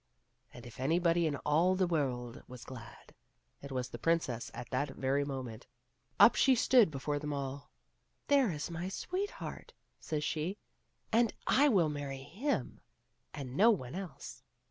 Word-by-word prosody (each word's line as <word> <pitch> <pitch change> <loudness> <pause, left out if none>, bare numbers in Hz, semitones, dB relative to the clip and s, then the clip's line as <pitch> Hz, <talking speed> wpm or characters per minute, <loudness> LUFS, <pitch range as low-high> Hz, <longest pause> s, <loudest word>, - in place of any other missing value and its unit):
And 120 - -12
if 120 - -11
anybody 170 +4 +2
in 145 - -1
all 165 +5 +4
of - - -2
the 185 - +3
world 130 -8 -2
was 125 -1 -10
glad, 120 -2 -11 0.5
it 140 - -9
was 125 -1 -2
the - - -8
princess 165 -8 0
at 120 - -7
that 135 +2 -1
very 135 +2 +1
moment. 130 -5 -6 0.5
Up - - +9
she 265 -1 +4
stood 240 -4 +5
before 145 0 -2
them 150 0 -4
all; 140 0 -4 0.3
" - - -46
There 275 -7 +4
is 150 +1 -4
my 170 +3 -4
sweetheart," 370 - -5 0.3
says 150 -2 -3
she, 165 +7 -2 0.3
" - - -43
and 230 0 +4
I 290 +2 +5
will 180 - +3
marry 140 -2 -5
him 200 - -2 0.5
and 130 -3 -7
no 215 +8 +6
one 140 - 0
else." 175 -10 -7
150 Hz, 165 wpm, -33 LUFS, 130-185 Hz, 0.5 s, Up